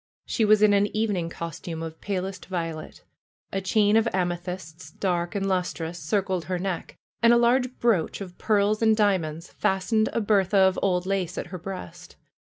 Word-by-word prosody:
She 225 - +1
was 215 0 +5
in 210 -1 +6
an 200 0 +3
evening 200 -6 0
costume 165 0 -6
of 160 0 -8
palest 190 -1 -4
violet; 165 -4 -5 0.5
a 195 - -1
chain 205 +2 +3
of 225 +1 +4
amethysts, 175 -4 -4
dark 175 +1 -2
and 195 -1 -1
lustrous, 175 -2 -2
encircled 185 +1 -1
her 185 0 -2
neck, 180 -1 -4 0.2
and 235 0 +6
a 240 - +6
large 250 +2 +2
brooch 220 -9 +1
of 185 -3 -8
pearls 210 0 +2
and 220 -1 +4
diamonds 175 -6 0
fastened 215 +3 +1
a - - 0
bertha 200 -2 +2
of 190 -1 +4
old 180 -2 +1
lace 190 -3 -2
at - - -3
her 185 - -4
breast. 185 - -8
190 Hz, 170 wpm, -25 LUFS, 175-210 Hz, 0.5 s, in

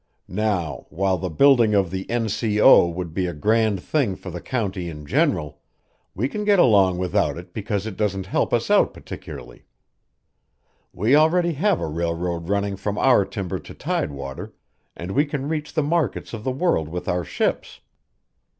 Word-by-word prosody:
Now, 90 -9 -2
while 95 +3 0
the 95 - -3
building 115 - +4
of 95 -4 +2
the 95 0 -5
N.C.O. 110 -2 +4
would 85 -1 -5
be 90 +1 -1
a 85 - -5
grand 110 +2 +1
thing 135 -11 0
for 95 - -9
the 85 0 -6
county 100 -8 -3
in 75 -2 -9
general, 75 +1 0 0.6
we 115 +8 0
can 210 +8 -4
get 205 -1 +4
along 100 - +4
without 90 -2 0
it 90 0 -11
because 105 -1 -3
it 110 -4 -6
doesn't 95 -3 -1
help 95 - 0
us - - 0
out - - +3
particularly. - - -10 1.3
We 110 +9 +2
already 170 +3 +3
have 185 +5 +1
a - - -2
railroad 85 +2 -3
running 100 -1 -1
from 100 +1 -3
our 125 -5 +4
timber 100 -2 -4
to - - -12
tidewater, 70 -2 -4 0.4
and 90 +2 -6
we 140 +8 +3
can 145 -2 -4
reach 150 -1 -3
the 155 - +2
markets 155 -4 -1
of 110 -2 -6
the 130 - -1
world 130 - 0
with 90 +2 -6
our 90 0 0
ships." - - -2
100 Hz, 170 wpm, -23 LUFS, 90-125 Hz, 1.3 s, building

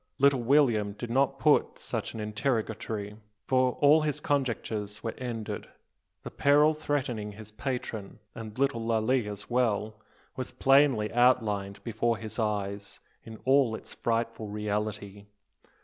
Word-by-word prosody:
Little 140 -2 +4
William 120 -6 +3
did 115 +3 -6
not 135 +2 +2
put 150 +2 +3
such - - -4
an - - -5
interrogatory. 110 -2 -2 0.3
All 130 +4 +4
his 150 -1 -1
conjectures 115 -7 -2
were 115 - -2
ended. 115 -4 -5 0.6
The - - -7
peril 150 +2 +4
threatening 130 -9 -2
his 105 0 -11
patron, 120 -4 -5 0.2
and 110 -1 -8
little 135 -3 +1
Lalee 115 +1 +1
as 105 -1 -7
well, 110 -3 0 0.3
was 130 - -4
plainly 135 -6 +3
outlined 105 -5 +2
before 115 0 0
his 110 +1 -7
eyes, 100 -2 -2 0.3
in 110 -1 -9
all 130 -4 +4
its - - -10
frightful 115 -1 -2
reality. 105 -1 -4
115 Hz, 130 wpm, -28 LUFS, 105-130 Hz, 0.6 s, Little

